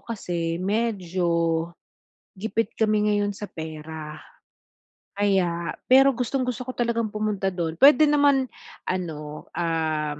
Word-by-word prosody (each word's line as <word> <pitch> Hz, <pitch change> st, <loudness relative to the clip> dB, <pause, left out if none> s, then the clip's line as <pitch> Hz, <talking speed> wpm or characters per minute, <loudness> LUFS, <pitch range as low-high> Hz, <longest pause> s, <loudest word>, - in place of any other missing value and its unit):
kasi 170 Hz, -7 st, -3 dB
medyo 175 Hz, -5 st, 0 dB, 0.7 s
gipit 220 Hz, +2 st, -2 dB
kami 215 Hz, -1 st, +2 dB
ngayon 205 Hz, 0 st, +1 dB
sa 210 Hz, -, -7 dB
pera. 155 Hz, -1 st, -8 dB, 1.0 s
Kaya 175 Hz, -5 st, +1 dB, 0.2 s
pero 270 Hz, +1 st, +7 dB
gustong-gusto 250 Hz, 0 st, -2 dB
ko 255 Hz, -, -4 dB
talagang 235 Hz, -2 st, 0 dB
pumunta 210 Hz, -2 st, -1 dB
dun 170 Hz, -3 st, -2 dB
puwede 300 Hz, +2 st, +7 dB
naman 285 Hz, -2 st, +4 dB, 0.4 s
ano, 150 Hz, -5 st, -5 dB
um, 155 Hz, -3 st, -1 dB
190 Hz, 105 wpm, -24 LUFS, 165-230 Hz, 1.0 s, pero